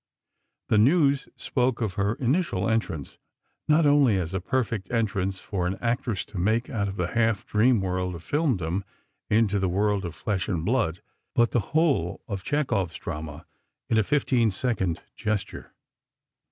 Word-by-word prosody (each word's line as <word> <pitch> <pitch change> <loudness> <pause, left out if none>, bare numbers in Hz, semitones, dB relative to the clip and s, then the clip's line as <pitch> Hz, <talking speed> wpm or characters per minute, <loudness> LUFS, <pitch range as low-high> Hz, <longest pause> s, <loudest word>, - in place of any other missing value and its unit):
The 105 - +4
News 140 +3 +3
spoke 125 -2 0
of 110 -5 -1
her 100 +4 0
initial 130 - 0
entrance, 110 -10 -2 0.5
"Not 155 +1 +4
only 140 -7 +5
as 90 -1 -3
a 95 - -1
perfect 110 -2 -1
entrance 100 -5 -1
for 90 -2 -2
an 95 +2 -2
actress 115 -4 -1
to 100 - -7
make 110 +6 +1
out 100 -4 -1
of 95 - -4
the 90 -3 -1
half 115 -2 +1
dream 115 +1 +3
world 90 -1 -2
of 85 - -10
filmdom 100 - 0 0.5
into 105 -2 +3
the 95 -1 +1
world 100 +2 +1
of 85 -2 -5
flesh 95 +1 -2
and 85 -4 -1
blood, 100 -7 0 0.3
but 120 0 +3
the 120 - +2 0.2
whole 140 - +2
of 100 -4 -4
Chekhov's 110 - 0
drama 75 -1 -6 0.5
in 110 - +4
a - - +3
fifteen 130 -2 +2
second 100 -4 -1
gesture." 105 -2 -3
105 Hz, 160 wpm, -26 LUFS, 95-120 Hz, 0.5 s, only